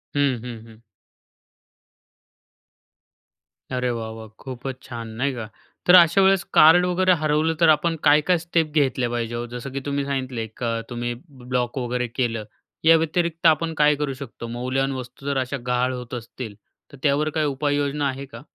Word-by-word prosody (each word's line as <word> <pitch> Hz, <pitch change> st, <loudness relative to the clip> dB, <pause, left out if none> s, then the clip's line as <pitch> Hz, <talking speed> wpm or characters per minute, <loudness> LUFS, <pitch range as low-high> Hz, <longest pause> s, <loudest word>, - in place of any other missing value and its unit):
हं, 140 Hz, -4 st, +2 dB
हं, 120 Hz, -2 st, -7 dB
हं. 110 Hz, -1 st, -16 dB, 3.0 s
अरे 125 Hz, 0 st, 0 dB
वाह, 115 Hz, -1 st, -4 dB
वाह! 110 Hz, -1 st, -9 dB
खूपच 130 Hz, 0 st, -6 dB
छान, 115 Hz, -3 st, -7 dB
नाही 140 Hz, -1 st, +1 dB
का? 115 Hz, -3 st, -6 dB, 0.4 s
तर 180 Hz, -, +7 dB
अशा 175 Hz, +2 st, +7 dB
वेळेस 190 Hz, -1 st, +4 dB
कार्ड 175 Hz, +3 st, +7 dB
वगैरे 185 Hz, +1 st, +3 dB
हरवलं, 155 Hz, +2 st, +2 dB
तर 165 Hz, -, +6 dB
आपण 165 Hz, +2 st, +3 dB
काय-काय 150 Hz, +5 st, +4 dB
स्टेप 165 Hz, -1 st, 0 dB
घेतल्या 135 Hz, -5 st, +1 dB
पाहिजेत 120 Hz, -1 st, -3 dB
हो? 120 Hz, -, -3 dB
जसं 130 Hz, +2 st, -6 dB
की 140 Hz, -, -3 dB
तुम्ही 140 Hz, -1 st, -1 dB
सांगितलं 130 Hz, -4 st, -3 dB
एक 110 Hz, +2 st, -8 dB
अ, 115 Hz, -1 st, -1 dB
तुम्ही 120 Hz, 0 st, -3 dB, 0.2 s
ब्लॉक 125 Hz, -1 st, -3 dB
वगैरे 125 Hz, 0 st, -1 dB
केलं, 115 Hz, -2 st, -2 dB, 0.4 s
याव्यतिरिक्त 165 Hz, +1 st, +2 dB
आपण 160 Hz, +1 st, +2 dB
काय 150 Hz, 0 st, +5 dB
करू 145 Hz, -1 st, -2 dB
शकतो? 115 Hz, -1 st, -9 dB
मौल्यवान 130 Hz, +3 st, -1 dB
वस्तू 125 Hz, +2 st, -14 dB
जर 140 Hz, -1 st, 0 dB
अशा 130 Hz, +2 st, -1 dB
गहाळ 125 Hz, +1 st, +1 dB
होत 125 Hz, -1 st, -7 dB
असतील, 115 Hz, -2 st, -7 dB, 0.4 s
तर 140 Hz, -, -12 dB
त्यावर 150 Hz, +2 st, +2 dB
काही 155 Hz, 0 st, 0 dB
उपाययोजना 145 Hz, 0 st, 0 dB
आहे 135 Hz, +1 st, -5 dB
का? 115 Hz, -2 st, -11 dB
135 Hz, 165 wpm, -23 LUFS, 120-155 Hz, 3.0 s, तर